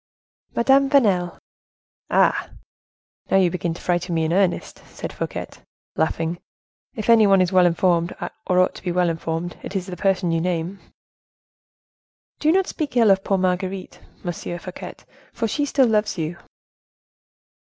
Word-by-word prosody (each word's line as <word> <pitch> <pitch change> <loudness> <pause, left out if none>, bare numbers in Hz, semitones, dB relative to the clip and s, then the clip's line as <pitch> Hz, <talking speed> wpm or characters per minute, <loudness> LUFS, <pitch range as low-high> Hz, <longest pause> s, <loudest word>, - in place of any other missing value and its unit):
"Madame 270 +3 +4
Vanel." 200 -11 +2 0.7
"Ah! - - +2 0.8
now 195 - +4
you 185 -3 +3
begin 170 -2 -2
to - - -11
frighten 175 0 0
me 160 - +1
in 160 - 0
earnest," 190 -1 0
said - - -7
Fouquet, - - -4 0.5
laughing; 165 +1 -1 0.6
"if 215 - -5
any 225 -2 +6
one 195 -1 +5
is 185 -1 +2
well 185 -1 +5
informed, 170 0 +1 0.4
or 180 - +2
ought 185 - +3
to - - -11
be 180 - -2
well 180 0 +2
informed, 165 +1 -4
it 200 - -8
is 185 -2 -1
the 185 - -6
person 185 -3 +1
you 165 0 +1
name." 180 +2 -2 1.6
"Do 310 - +3
not 380 +2 +3
speak 290 -8 -4
ill 225 -4 +6
of 195 0 +2
poor 195 - +1
Marguerite, 185 +1 -2 0.2
Monsieur 175 0 -4
Fouquet, 180 +1 -8 0.4
for 230 - -1
she 290 +7 -1
still 275 -2 +3
loves 215 -3 +1
you." 160 +1 -3
185 Hz, 155 wpm, -22 LUFS, 175-210 Hz, 1.6 s, any